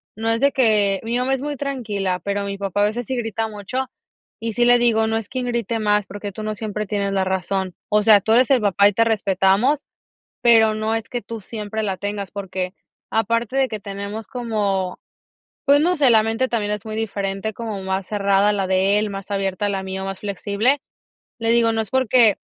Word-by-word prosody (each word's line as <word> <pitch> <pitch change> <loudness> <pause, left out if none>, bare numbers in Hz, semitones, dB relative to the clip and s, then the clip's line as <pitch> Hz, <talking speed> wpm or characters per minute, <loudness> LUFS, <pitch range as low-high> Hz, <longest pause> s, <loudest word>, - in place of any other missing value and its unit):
no 225 +2 -2
es 225 0 +2
de 280 +2 +3
que 210 -6 +2
mi 230 +2 -1
mamá 255 +2 +1
es 265 - -1
muy 290 -1 -4
tranquila, 210 -10 -2
pero 200 0 -2
mi 200 0 -4
papá 200 0 -1
a - - +5
veces 230 +3 -2
sí 260 +2 -3
grita 225 -1 -2
mucho, 235 +6 -4 0.5
y 225 -1 -3
sí 240 - +2
le 245 0 +5
digo: 225 -2 +3
"No 225 - 0
es 225 - -5
quien 255 -1 -3
grite 235 -1 -1
más, 210 -1 +1
porque 205 0 -6
tú 215 - -8
no 215 0 -3
siempre 210 0 -4
tienes 200 -1 -1
la 190 -1 +1
razón". 190 -1 -2
O 210 0 +3
sea, 210 -2 +7
tú 220 - -1
eres 250 +3 +5
el 255 -4 +4
papá 200 0 +4
y 205 - +1
te 230 - +3
respetamos, 210 +5 +2 0.6
pero 225 -3 +5
no 215 +1 -1
es 225 0 -3
que 245 -2 -3
tú 230 -2 -7
siempre 215 +1 -5
la 195 -3 -2
tengas, 200 -1 -4
porque 190 -2 -4 0.4
aparte 230 +3 0
de 270 - +3
que 215 -4 -5
tenemos 200 +2 -6
como, 205 -7 -2 0.7
pues 285 +1 +6
no 355 +4 +3
sé, 280 -3 +4
la 220 -2 +6
mente 225 +4 0
también 210 -3 -1
es 210 +1 -5
muy 215 0 -4
diferente, 200 -1 -3
como 215 -3 -5
más 190 0 -2
cerrada 200 0 +2
la 195 -2 -1
de 190 +2 +2
él, 210 -1 -1
más 195 0 -7
abierta 195 +1 -1
la 195 -1 -2
mía, 190 0 -5
o 195 - -4
más 195 -1 -5
flexible. 210 +6 0 0.6
Le 230 -1 0
digo: 230 -1 +4
"No 225 - 0
es 220 - -3
porque 250 -4 +4
215 Hz, 220 wpm, -21 LUFS, 200-230 Hz, 0.7 s, sea